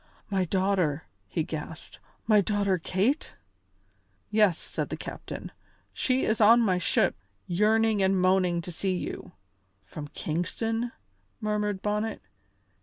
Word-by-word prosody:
"My 190 Hz, -2 st, +2 dB
daughter!" 185 Hz, -5 st, +1 dB, 0.2 s
he 165 Hz, -, -1 dB
gasped. 155 Hz, 0 st, -7 dB, 0.3 s
"My 215 Hz, -2 st, +5 dB
daughter 200 Hz, -2 st, +1 dB
Kate?" 200 Hz, -, 0 dB, 1.0 s
"Yes," 210 Hz, -6 st, +4 dB
said -, -, -4 dB
the -, -, -4 dB
captain; -, -, -7 dB, 0.4 s
"she 260 Hz, 0 st, +1 dB
is 220 Hz, 0 st, +1 dB
on 225 Hz, +3 st, +8 dB
my 190 Hz, -6 st, +2 dB
ship, -, -, +2 dB, 0.3 s
yearning 215 Hz, +3 st, +2 dB
and 190 Hz, 0 st, +3 dB
moaning 185 Hz, -2 st, +3 dB
to 180 Hz, -, -6 dB
see 185 Hz, +3 st, -1 dB
you." -, -, -5 dB, 0.5 s
"From 145 Hz, +9 st, -7 dB
Kingston?" 225 Hz, +11 st, -2 dB, 0.5 s
murmured 210 Hz, -2 st, -1 dB
Bonnet. 210 Hz, +1 st, -1 dB
195 Hz, 120 wpm, -28 LUFS, 180-215 Hz, 1.0 s, on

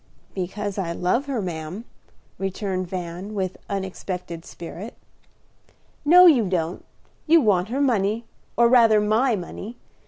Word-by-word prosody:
"Because 195 Hz, +2 st, -4 dB
I 170 Hz, -3 st, -2 dB
love 210 Hz, +12 st, 0 dB
her, 255 Hz, -7 st, -2 dB
ma'am," 175 Hz, +5 st, -5 dB, 0.5 s
returned 190 Hz, -1 st, -3 dB
Van, 180 Hz, +3 st, -6 dB
with 190 Hz, -2 st, -2 dB
unexpected 185 Hz, -3 st, -5 dB
spirit. 180 Hz, +6 st, -9 dB, 1.1 s
"No, 355 Hz, +4 st, +8 dB
you 260 Hz, -, +6 dB
don't; 175 Hz, -2 st, -2 dB, 0.4 s
you 330 Hz, +2 st, +7 dB
want 205 Hz, -, +2 dB
her 265 Hz, +4 st, -1 dB
money, 225 Hz, -3 st, +1 dB, 0.3 s
or 235 Hz, 0 st, +6 dB
rather 230 Hz, -3 st, +6 dB
my 220 Hz, +4 st, +2 dB
money. 205 Hz, +5 st, -7 dB
200 Hz, 125 wpm, -23 LUFS, 180-235 Hz, 1.1 s, No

